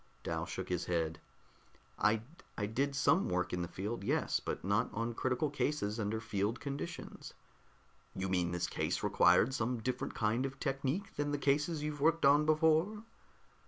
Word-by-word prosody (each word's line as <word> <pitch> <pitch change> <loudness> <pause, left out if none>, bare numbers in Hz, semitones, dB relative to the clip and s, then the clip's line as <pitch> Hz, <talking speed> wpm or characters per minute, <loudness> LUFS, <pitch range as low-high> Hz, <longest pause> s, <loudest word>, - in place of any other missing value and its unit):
Dal - - -2
shook - - -5
his 90 -2 -1
head. 80 -2 -1 0.8
"I 105 +1 +3 0.3
I 105 - 0
did 135 +6 -1
some 170 +7 +3
work 90 0 -1
in 90 - -1
the 85 - -2
field, 100 +4 -4
yes, 145 +8 +1
but - - -4
not 100 +3 +2
on 115 +2 -1
critical 130 +5 0
cases 135 -7 -1
under 110 +1 -1
field 110 0 -1
conditions." 145 +4 -6 0.8
"You 95 0 -2
mean 90 -2 +1
that - - -4
this 90 - -1
case - - -2
required 130 - +4
some 125 0 0
different 125 +2 -3
kind 110 +3 +1
of 135 0 -10
technique 140 +8 -2
than 145 0 0
the 145 - 0
cases 150 +3 +1
you've 150 -1 -3
worked 160 0 +3
on 145 +2 +5
before?" 160 +7 +3
130 Hz, 170 wpm, -34 LUFS, 105-150 Hz, 0.8 s, on